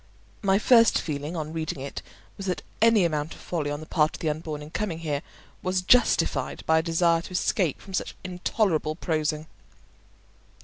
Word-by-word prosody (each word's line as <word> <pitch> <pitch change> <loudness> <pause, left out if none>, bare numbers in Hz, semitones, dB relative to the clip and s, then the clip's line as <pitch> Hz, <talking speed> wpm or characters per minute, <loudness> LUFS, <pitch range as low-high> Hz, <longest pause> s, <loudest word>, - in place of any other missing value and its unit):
My 195 -2 +3
first 230 +1 +5
feeling 150 +2 -4
on 155 -1 -4
reading 160 -3 -3
it 140 +1 -6 0.3
was 195 - -6
that 180 - -2 0.2
any 225 -4 +5
amount 155 -1 -2
of - - -15
folly 155 -5 -3
on 145 +1 -4
the - - -8
part 155 0 +1
of - - -10
the 155 - 0
unborn 150 -1 -5
in 150 - -11
coming 175 -1 -2
here 150 -4 -2 0.4
was 185 0 0
justified 175 - +3
by 160 0 +4
a - - +1
desire 165 0 +2
to 175 - -11
escape 180 -3 +1
from 195 - -12
such - - -2
intolerable 180 -3 0
prosing. 155 -2 -1
165 Hz, 180 wpm, -26 LUFS, 155-185 Hz, 0.4 s, first